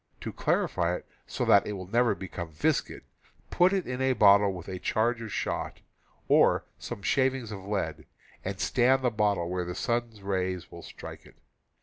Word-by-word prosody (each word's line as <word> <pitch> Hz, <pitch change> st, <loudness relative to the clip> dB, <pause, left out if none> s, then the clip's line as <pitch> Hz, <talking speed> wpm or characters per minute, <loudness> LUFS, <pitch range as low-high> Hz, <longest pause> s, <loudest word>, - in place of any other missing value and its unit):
To -, -, -5 dB
clarify 85 Hz, +1 st, 0 dB
it -, -, -8 dB, 0.2 s
so -, -, -2 dB
that 100 Hz, -, +5 dB
it 105 Hz, -, -3 dB
will 95 Hz, -2 st, -6 dB
never 120 Hz, +5 st, +2 dB
become 85 Hz, -3 st, -6 dB
viscid, 75 Hz, -, -1 dB, 0.5 s
put 180 Hz, +1 st, +4 dB
it 195 Hz, -3 st, 0 dB
in 125 Hz, +1 st, -4 dB
a 130 Hz, 0 st, +3 dB
bottle 100 Hz, -3 st, +6 dB
with 90 Hz, -2 st, -8 dB
a 95 Hz, -1 st, -5 dB
charge 115 Hz, +4 st, 0 dB
of 110 Hz, -2 st, -6 dB
shot, -, -, -3 dB, 0.5 s
or -, -, +4 dB
some 100 Hz, -, -7 dB
shavings 130 Hz, -3 st, +1 dB
of 95 Hz, -2 st, -7 dB
lead, 80 Hz, -7 st, -3 dB, 0.4 s
and 95 Hz, 0 st, -4 dB
stand 130 Hz, +6 st, +3 dB
the 125 Hz, -, +2 dB
bottle 105 Hz, -5 st, +1 dB
where 90 Hz, 0 st, -2 dB
the 90 Hz, 0 st, -5 dB
sun's 120 Hz, -3 st, -2 dB
rays 95 Hz, -2 st, -2 dB
will 85 Hz, -, -9 dB
strike -, -, -10 dB
it. -, -, -19 dB
100 Hz, 185 wpm, -28 LUFS, 90-120 Hz, 0.5 s, bottle